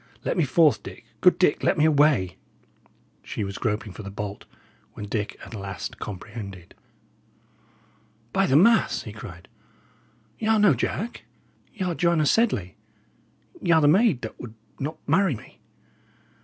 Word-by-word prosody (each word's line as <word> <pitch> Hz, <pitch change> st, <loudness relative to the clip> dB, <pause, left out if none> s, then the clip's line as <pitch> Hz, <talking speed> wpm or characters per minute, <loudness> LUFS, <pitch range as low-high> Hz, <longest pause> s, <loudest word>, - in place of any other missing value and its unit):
Let -, -, 0 dB
me 170 Hz, -, +2 dB
forth, 155 Hz, +1 st, +4 dB
Dick -, -, -11 dB, 0.2 s
good 180 Hz, -, +5 dB
Dick, 180 Hz, -5 st, +2 dB
let -, -, +2 dB
me 155 Hz, -, +4 dB
away!" 140 Hz, -, +3 dB, 0.8 s
She 105 Hz, -, -4 dB
was 100 Hz, 0 st, -5 dB
groping 105 Hz, -2 st, -2 dB
for -, -, -9 dB
the 100 Hz, -, -7 dB
bolt, 100 Hz, 0 st, -6 dB, 0.5 s
when 105 Hz, -, -7 dB
Dick 105 Hz, 0 st, -3 dB
at -, -, -12 dB
last 100 Hz, -2 st, -6 dB
comprehended. 100 Hz, -2 st, -8 dB, 1.6 s
"By 195 Hz, 0 st, +2 dB
the 135 Hz, -, +2 dB
mass!" 220 Hz, +9 st, +4 dB
he -, -, -8 dB
cried, -, -, -10 dB, 0.9 s
"y' 220 Hz, -, -2 dB
are 220 Hz, 0 st, +4 dB
no 205 Hz, -6 st, +5 dB
Jack; 200 Hz, -, -3 dB, 0.5 s
y' 190 Hz, -4 st, -2 dB
are 180 Hz, -, 0 dB
Joanna 170 Hz, -2 st, +2 dB
Sedley; 145 Hz, -, +1 dB, 0.8 s
y' -, -, -3 dB
are 160 Hz, -, +6 dB
the 145 Hz, -, +4 dB
maid 175 Hz, -, +4 dB
that 110 Hz, -, -7 dB
would 115 Hz, -2 st, -9 dB, 0.2 s
not 150 Hz, +3 st, -4 dB
marry 190 Hz, -7 st, +3 dB
me!" -, -, -14 dB
145 Hz, 155 wpm, -25 LUFS, -, 1.6 s, are